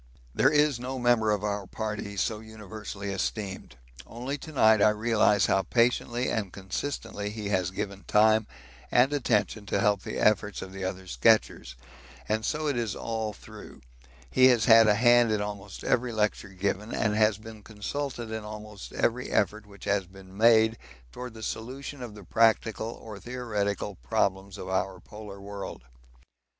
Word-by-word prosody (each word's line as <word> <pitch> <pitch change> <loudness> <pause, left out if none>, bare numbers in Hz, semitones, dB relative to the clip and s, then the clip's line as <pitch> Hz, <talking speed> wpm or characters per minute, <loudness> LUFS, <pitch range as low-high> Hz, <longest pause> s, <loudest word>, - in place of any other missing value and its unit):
There - - +4
is 150 -4 +3
no 130 +2 -4
member 120 -3 +3
of 105 -1 +1
our 100 -2 -2
party 105 -1 -5
so 105 +3 0
universally 105 -2 -7
esteemed; 95 - -4 0.3
only 125 +4 -4
to 155 - -9
night 110 -7 +5
I 105 - +7
realise 105 -2 +3
how 95 - +3
patiently 120 +4 +1
and 105 -5 -2
consistently 100 +2 -4
he 105 -1 -5
has 95 -3 +1
given 100 +1 -5
time 110 0 +4 0.4
and 130 +4 +4
attention 110 -6 0
to - - 0
help 100 -2 +2
the - - -5
efforts 105 -1 +2
of 95 0 -10
the 95 0 -6
other 95 0 -4
sketchers, 105 - +2 0.5
and 110 +1 0
so 155 +4 -1
it 145 -4 0
is 115 -4 -2
all 110 -1 -3
through; 105 - -13 0.5
he 130 - +6
has 120 -4 +4
had 115 -1 +8
a 105 - +5
hand 120 0 +5
in 105 - +1
almost 100 -1 -6
every 125 0 +1
lecture 105 -2 -1
given, 100 +3 -2
and 105 -1 +1
has 110 -1 +3
been 110 0 -11
consulted 115 +3 -5
in 110 -1 -4
almost 105 -1 -9
every 125 +2 0
effort 105 +2 0
which 100 -1 -15
has 100 -2 0
been 95 0 -14
made 110 0 +5 0.3
towards 125 -2 -8
the 110 - -9
solution 130 +6 -5
of 115 -4 -7
the 105 - -11
practical 110 +2 +2
or 110 -3 -9
theoretical 105 -4 -3
problems 95 +9 -1
of 95 - -7
our 95 0 -1
polar 105 -1 -10
world. 100 -9 -7
105 Hz, 165 wpm, -28 LUFS, 100-115 Hz, 0.5 s, had